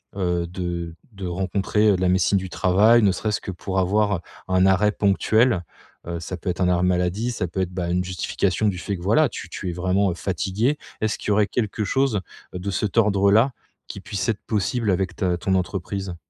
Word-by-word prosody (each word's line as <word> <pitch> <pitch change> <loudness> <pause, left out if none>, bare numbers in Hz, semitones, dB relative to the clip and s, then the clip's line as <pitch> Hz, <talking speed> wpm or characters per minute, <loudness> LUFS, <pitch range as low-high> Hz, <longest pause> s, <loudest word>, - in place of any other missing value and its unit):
heu, 90 -3 -1
de 85 -2 -4 0.2
de 95 -2 -6
rencontrer, 95 +4 +1
heu, - - +3
la 90 0 +1
médecine 95 +2 +3
du 95 -1 -4
travail, 105 +7 +4
ne 100 - +5
serait-ce 105 +2 -1
que - - -5
pour 95 +1 -3
avoir 100 +1 +2 0.3
un 95 0 +4
arrêt 95 +2 +4
ponctuel, 105 +1 +2 0.4
heu, 85 0 -3
ça 90 +3 -5
peut 90 - -4
être 90 - -3
un 90 - +3
arrêt 90 0 +2
maladie, 90 +6 0
ça 95 -6 -2
peut 95 +3 -3
être, 90 -1 -2
bah, 90 -2 -2
une 90 +1 +1
justification 95 +3 -1
du 95 - -3
fait 100 +1 -3
que - - -11
voilà, 140 +10 +3
tu 100 - -7
tu 90 +2 -5
es - - -3
vraiment, 95 +2 +1
heu, - - -5
fatigué? 100 - -1 0.2
Est-ce 110 -1 0
qu'il - - -5
y - - +3
aurait 105 0 +3
quelque 110 -3 -2
chose 130 0 +1 0.3
de 90 +2 -4
cet 100 +3 -2
ordre-là 105 +3 +4 0.3
qui - - -8
puisse 100 +3 -3
être 110 - -1
possible 110 +1 0
avec 95 0 -1
ta 90 -3 0
ton 95 +2 0
entreprise? 95 0 -3
95 Hz, 210 wpm, -23 LUFS, 90-105 Hz, 0.4 s, ne